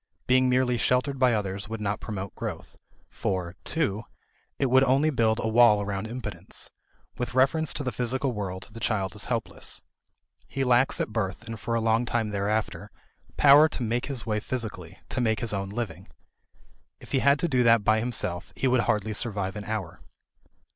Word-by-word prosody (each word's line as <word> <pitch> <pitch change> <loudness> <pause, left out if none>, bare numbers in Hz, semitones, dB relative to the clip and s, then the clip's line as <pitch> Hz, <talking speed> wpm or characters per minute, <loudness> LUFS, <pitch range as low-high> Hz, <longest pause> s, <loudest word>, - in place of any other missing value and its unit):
Being 130 0 +4
merely 125 -1 +2
sheltered 130 +2 +1
by 130 -2 +4
others 100 0 -3
would 115 0 -4
not 105 -1 -2
promote 100 -3 -5
growth. - - -6 0.3
For 90 -2 -3
(2) 125 -10 -1 0.5
it 140 - +1
would 130 +1 +5
only 135 +4 +3
build 115 -4 +2
a - - -1
wall 110 -2 +6
around 100 +1 -3
impotence. 105 -6 -5 0.5
With 125 0 -3
reference 145 +5 +3
to - - -2
the 125 - -2
physical 125 +3 0
world, 95 -4 -5
the 115 - -9
child 105 -4 -1
is 105 - -2
helpless. 115 -3 -4 0.6
He 135 - -2
lacks 125 +1 +3
at - - -1
birth 95 -4 -2
and 115 -1 -7
for 115 +3 -2
a 115 - +1
long 115 +2 +2
time 115 -3 -1
thereafter 100 -2 -2 0.5
power 145 +2 +7
to 130 - -3
make 120 +2 -1
his 135 -5 -1
way 105 -2 0
physically, 115 0 -5
to 130 - -2
make 110 -2 +1
his 115 -4 -2
own 95 -1 -2
living. 115 +1 -5 0.9
If - - -14
he 135 - +2
had 140 +2 +4
to 170 - 0
do 130 -5 +2
that 115 -3 +5
by 110 +2 +3
himself, 110 -7 -3
he 135 - 0
would 125 -1 +3
hardly 105 0 +1
survive 100 -2 -1
an 105 -1 -6
hour. 105 -6 -4
115 Hz, 185 wpm, -27 LUFS, 105-125 Hz, 0.9 s, power